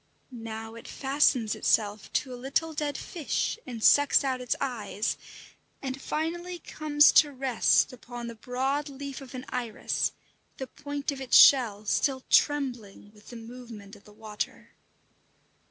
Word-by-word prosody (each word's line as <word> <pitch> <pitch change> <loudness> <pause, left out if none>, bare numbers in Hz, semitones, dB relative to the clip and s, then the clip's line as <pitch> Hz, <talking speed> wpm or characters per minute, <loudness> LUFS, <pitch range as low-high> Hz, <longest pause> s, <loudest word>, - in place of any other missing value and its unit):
Now 225 -2 -7
it 230 - -11
fastens 265 -5 +1
itself 210 -1 0
to 260 -3 -1
a - - -5
little 280 +6 -2
dead 295 -2 -2
fish 335 +6 -3
and 235 -3 -6
sucks 285 0 +5
out 260 -2 -1
its 250 - -1
eyes, 220 -5 -2 0.6
and 270 0 -5
finally 345 +3 -3
comes 300 -2 +3
to 295 -2 +5
rest 245 - +2
upon 240 -1 -8
the 235 - -6
broad 265 +6 -2
leaf 275 0 -7
of 265 0 -10
an 255 - -7
iris, 240 -4 -2 0.5
the 265 - -4
point 285 +2 -5
of 275 -1 -7
its 260 - +4
shell 220 -6 +6
still 260 +4 0
trembling 245 -9 +1
with 210 0 -20
the 240 - -10
movement 230 -3 -10
of - - -19
the 210 - -16
water. 210 0 -6
255 Hz, 150 wpm, -28 LUFS, 225-285 Hz, 0.6 s, shell